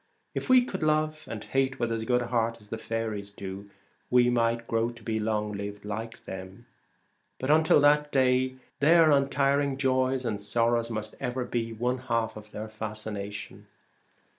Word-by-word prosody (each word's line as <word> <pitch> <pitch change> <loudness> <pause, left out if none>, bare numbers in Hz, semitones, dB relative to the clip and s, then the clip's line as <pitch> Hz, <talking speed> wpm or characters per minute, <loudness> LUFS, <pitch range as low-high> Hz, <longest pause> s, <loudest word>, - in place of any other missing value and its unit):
If - - -4
we 255 -1 +7
could 190 -6 -5
love 155 0 0
and 110 -2 -5
hate 135 0 0
with 120 -1 0
as 115 -1 -2
good 125 0 +2
heart 115 -1 0
as 105 -1 -19
the 115 - -4
faeries 110 -3 -3
do, 100 0 -8 0.4
we 125 0 +5
might 115 -1 +1
grow 115 0 0
to 115 -1 -12
be 110 0 -1
long 105 -1 -1
lived 100 0 -6
like 110 +2 -6
them. 95 +4 -8 0.7
But 130 +3 0
until 160 0 +5
that 150 0 +4
day 130 -1 +2 0.2
their 160 +2 +6
un 140 -1 +3
tiring 140 -1 +1
joys 130 -1 +1
and 105 -3 -2
sorrows 115 +2 +1
must 110 -1 -4
ever 125 -1 -2
be 115 -2 -2
one 125 +3 -1
half 115 -3 -1
of 105 0 -10
their 105 +1 -6
fascination. 110 -2 -6
115 Hz, 170 wpm, -28 LUFS, 110-130 Hz, 0.7 s, we